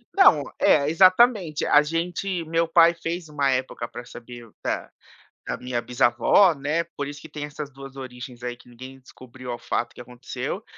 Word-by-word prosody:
Não, 160 - +6 0.2
é, 140 +1 +4
exatamente, 185 -1 +4
a 150 - +6
gente 170 +3 -2
meu 165 +1 0
pai 165 0 +6
fez 165 0 -5
uma 140 -2 0
época 130 -2 -2
pra 120 0 -9
saber 120 -1 -11
o - - -25
da - - -2 0.6
da - - -3
minha 125 -1 -3
bisavó, 125 - +3
né, 150 +4 -1
por 140 - -2
isso 145 +1 -8
que - - -11
tem 150 -1 -7
essas 150 -1 -6
2 135 0 -12
origens 125 -1 -9
aí 120 0 -4
que 120 - -20
ninguém 130 +2 -12
descobriu 130 0 -11
ao 120 - -5
fato 120 - -2
o - - -24
que - - -14
aconteceu, 125 0 -6
140 Hz, 190 wpm, -24 LUFS, 125-165 Hz, 0.6 s, Não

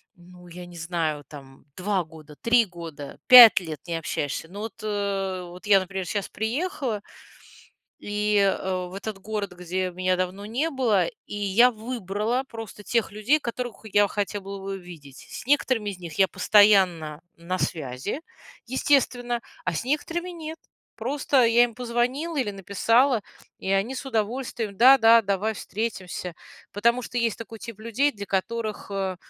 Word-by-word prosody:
ну, 180 0 -16
я 175 +1 -9
не 175 -1 -12
знаю, 165 -3 -2
там 135 -3 -13
2 190 -1 0
года, 155 -2 -14
3 235 -1 +4
года, 165 -6 -9
5 245 -6 +11
лет 160 -6 -7
не 170 - -3
общаешься. 150 0 -3
Но 200 +3 -8
вот, 225 - -5
э, 200 -3 -2
вот 180 +3 -11
я, 200 -2 +7
например, 190 0 -4
щас 205 0 -2
приехала 250 - -2 1.0
и, 210 0 0
э, 190 -2 +1
в - - -13
этот 200 0 -5
город, 205 -1 -4
где 180 +1 -3
меня 185 +1 0
давно 185 +2 -3
не 250 +9 -1
было, 250 -8 +2 0.2
и 205 - -7
я 205 +5 +4
выбрала 220 0 -2
просто 225 -2 -9
тех 225 -1 0
людей, 215 +9 +2
которых 245 -1 -5
я 205 -1 +3
хотела 205 0 -3
бы 195 0 -7
увидеть. 165 -7 -11
С - - -8
некоторыми 255 -6 +2
из 190 - -8
них 170 -3 -8
я 195 - +6
постоянно 185 -8 +4
на 175 +2 -4
связи, 140 - -3 0.5
естественно, 245 -2 +1 0.2
а 180 - -1
с 160 - -2
некоторыми 330 +6 -2
нет. 320 -2 -7 0.4
Просто 270 +3 +1
я 235 +1 +5
им 235 -2 -4
позвонила 250 +7 -1
или 215 -6 -1
написала, 225 +6 +2 0.4
и - - -6
они 210 +7 0
с 255 - -6
удовольствием: 225 -2 -2
"Да-да, 230 -1 +7
давай 200 +2 -1
встретимся". 190 -6 -4 0.4
Потому 235 +4 +2
что 245 +1 -4
есть 230 -2 0
такой 225 0 -9
тип 225 -1 -9
людей, 230 +6 +1
для 200 -2 -8
которых, 215 +2 -3
э, 190 -2 -2
205 Hz, 160 wpm, -25 LUFS, 185-235 Hz, 1.0 s, 5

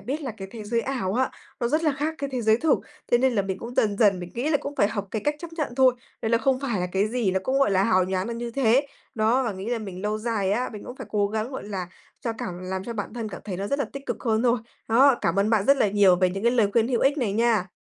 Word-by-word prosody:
biết 270 +10 -3
là 270 -4 -4
cái 195 -1 -7
thế 220 -1 -8
giới 230 +2 0
ảo 230 -8 -2
á, 260 +2 +1 0.3
nó 235 - +1
rất 310 +5 +1
là 310 -3 +2
khác 300 +3 -2
cái 280 0 -3
thế 255 - -1
giới 220 -1 +4
thực. 310 +1 +3 0.3
Thế 240 - +6
nên 260 +1 +3
là 205 -4 +1
mình 190 -1 -3
cũng 235 +4 -7
dần 205 -2 +2
dần, 200 -5 +4
mình 175 0 -7
nghĩ 255 +6 -1
là 305 - +4
cũng 285 0 -6
phải 200 - +3
học 200 -2 -4
cái 220 - -3
cách 295 - +1
chấp 335 +1 -9
nhận 300 -7 -3
thôi, 260 -2 +5 0.3
đấy 220 - 0
là 230 - +4
không 265 +1 +1
phải 235 -9 -1
là 180 - 0
cái 195 +2 +1
gì 230 -4 0
nó 190 0 0
cũng 265 +6 +1
gọi 275 -6 +3
là 195 0 +3
hào 185 -4 +3
nhoáng 185 +1 -1
được 235 - -4
như 235 0 -4
thế. 260 +2 +3 0.3
Đó, 230 +3 +2
và 230 -4 -1
nghĩ 190 +3 -6
là 240 -1 0
mình 195 -4 -7
lâu 210 +1 -1
dài 215 -4 0
á, 245 +4 0
mình 210 - -8
cũng 245 - -8
phải - - -8
cố 205 -1 +2
gắng, 220 +3 -2
gọi 265 - -6
là, 190 -4 -4 0.3
cho 230 - -2
cảm 175 -1 -5
làm 190 +1 -4
cho 235 - -4
bản 215 0 -5
thân 230 -2 -4
cảm 200 - -8
thấy 195 -4 -4
nó 195 +2 -3
rất 280 +7 -1
là 280 - +1
tích 275 0 -8
cực - - -4
hơn 225 -2 +1
thôi. 245 0 +3 0.3
Đó. 260 +4 +6
Cảm - - 0
ơn 200 +2 +2
bạn 215 -4 +3
rất 275 - +6
là 215 - +3
nhiều 195 -2 +5
về 185 0 +2
những 195 +2 -5
cái 235 +1 +3
lời 230 -5 +3
khuyên 230 +1 +3
hữu 245 -3 +1
ích 280 +3 +3
này 230 -7 0
nha! 220 -4 +1
225 Hz, 320 wpm, -25 LUFS, 200-260 Hz, 0.3 s, Thế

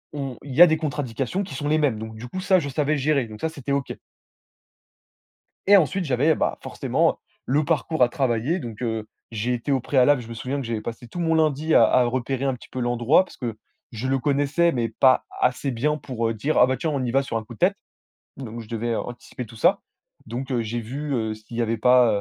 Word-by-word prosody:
on 135 -4 -4
il 140 -2 -7
y 150 - +4
a 175 - +11
des 160 -1 +2
contre 150 -2 -3
indications 135 - -2
qui 180 - -8
sont 145 +2 -3
les 155 +1 +3
mêmes. 140 -7 +1
Donc 110 0 -7
du 115 +3 -8
coup, 185 - -6
ça, 185 0 +4
je 145 -4 -4
savais 150 +2 0
gérer, 140 -1 +1
donc 110 -1 -10
ça, 160 - 0
c'était 140 -4 -6
OK 140 -1 -1 1.7
et 200 +1 +8
ensuite, 190 +1 +2
j'avais, 145 +2 +2
bah, - - 0
heu, - - -38
forcément, - - 0 0.3
le 145 +4 +1
parcours 155 0 0
à 125 - +6
travailler. 130 +5 0
Donc 115 -3 -7
heu, 110 -2 -2 0.2
j'ai 115 +2 -1
été 125 +4 -2
au 135 - +2
préalable 130 +1 +3
je 115 - -12
me 115 - -7
souviens 130 +5 -3
que 130 - -5
j'avais 115 -2 -2
passé 115 +2 -7
tout 175 +10 -7
mon 165 -1 +1
lundi 155 0 +2
à - - +7
à 125 - +4
repérer 130 +2 -2
un 135 - +1
petit 120 - -14
peu 130 - -5
l'endroit 120 +7 +3
parce - - -15
que 115 -4 -5 0.3
je 120 +3 -4
le 135 0 +2
connaissais 145 +5 +2
mais 120 -4 -1
pas 130 +3 +3 0.2
assez 125 +2 +1
bien 140 +5 0
pour, 115 -5 -2
heu, 115 - -2
dire: 140 +8 0
«Ah 125 - +7
bah 130 +1 0
tiens, 160 - -1
on 140 -3 -1
y 120 - -1
va 135 +3 +2
sur 120 -4 -4
un 110 - -3
coup 120 - -11
de - - -18
tête». - - +3 0.6
Donc 120 -3 -7
je 110 - -11
devais 115 +1 -2
anticiper 120 +1 -6
tout 115 - -14
ça. 110 - +3 0.5
Donc 125 +4 -5
heu, 120 -3 0
j'ai 115 +2 -3
vu, 140 +6 -5
heu, 110 -3 -1
s'il 110 +2 -11
y 120 - +1
avait 115 0 0
pas, 125 +1 +5
130 Hz, 250 wpm, -24 LUFS, 115-145 Hz, 1.7 s, a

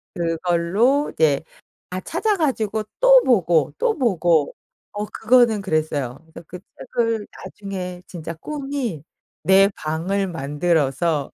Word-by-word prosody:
그걸로 175 - +1
이제 150 -3 +2 0.5
다 185 +1 -4
찾아 410 - 0
가지고 220 - -1 0.2
또 - - +7
보고 175 -9 +2
또 475 -5 0
보고 175 - +2 0.4
어 205 0 -4
그거는 225 -1 +3
그랬어요. 155 -7 -2
그래서 165 - -11
그 180 - -8 0.4
책을 230 -2 +1 0.2
나중에 185 -3 -7
진짜 165 -2 -7
꿈이 270 - -5 0.4
내 195 +3 +5
방을 175 +6 -2
만들어서 150 -1 0
185 Hz, 240 characters per minute, -21 LUFS, 160-230 Hz, 0.5 s, 또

